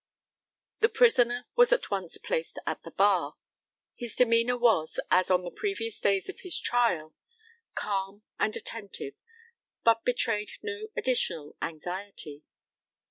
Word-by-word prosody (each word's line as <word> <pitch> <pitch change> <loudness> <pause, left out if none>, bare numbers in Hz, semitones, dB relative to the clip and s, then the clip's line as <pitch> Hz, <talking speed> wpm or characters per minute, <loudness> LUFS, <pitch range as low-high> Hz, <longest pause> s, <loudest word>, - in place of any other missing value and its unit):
The 445 - +4
prisoner 245 - +4
was 485 0 +6
at - - +1
once - - -3
placed 485 -1 -3
at - - -2
the - - -10
bar. - - +2 0.6
His 240 -3 -6
demeanour 235 0 +4
was, 220 -10 +2
as 185 0 +4
on 185 -1 +3
the 175 - -5
previous 230 - -3
days 195 -1 +2
of 385 - -7
his 370 -2 +1
trial, 175 -11 +1 0.6
calm 195 0 -3 0.2
and 215 - +1
attentive, 200 -10 -6 0.7
but 230 0 +4
betrayed 230 -4 0
no 435 0 -4
additional 170 - 0
anxiety. 170 -2 -5
230 Hz, 130 wpm, -29 LUFS, 190-250 Hz, 0.7 s, was